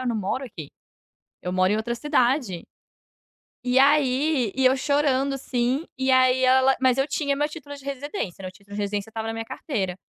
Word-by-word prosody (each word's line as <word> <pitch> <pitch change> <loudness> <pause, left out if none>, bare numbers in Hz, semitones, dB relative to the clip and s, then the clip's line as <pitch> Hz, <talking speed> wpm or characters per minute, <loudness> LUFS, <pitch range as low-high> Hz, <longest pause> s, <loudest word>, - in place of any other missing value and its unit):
eu 255 - -4
não 235 - 0
moro 215 +6 -2
aqui. 165 - -9 0.7
Eu 180 0 -4
moro 185 +1 +3
em 210 - +2
outra 235 +2 -2
cidade." 250 - 0 1.0
E 250 +1 +2
aí, 275 -3 +3
e 265 - 0
eu 255 - +5
chorando 275 0 +1
assim, 260 +3 -1
e 265 0 -1
aí 255 0 +4
ela 260 +1 +4
mas 255 -1 +3
eu 270 - +1
tinha 280 -1 -1
meu 295 +1 0
título 295 -2 -9
de 280 - -14
residência, 280 - -5
meu 185 - -5
título 200 +1 -13
de 210 - -2
residência 205 +1 -3
estava 220 0 -5
na 225 - -3
minha 225 0 -5
carteira. 195 - -3
255 Hz, 195 wpm, -24 LUFS, 220-275 Hz, 1.0 s, eu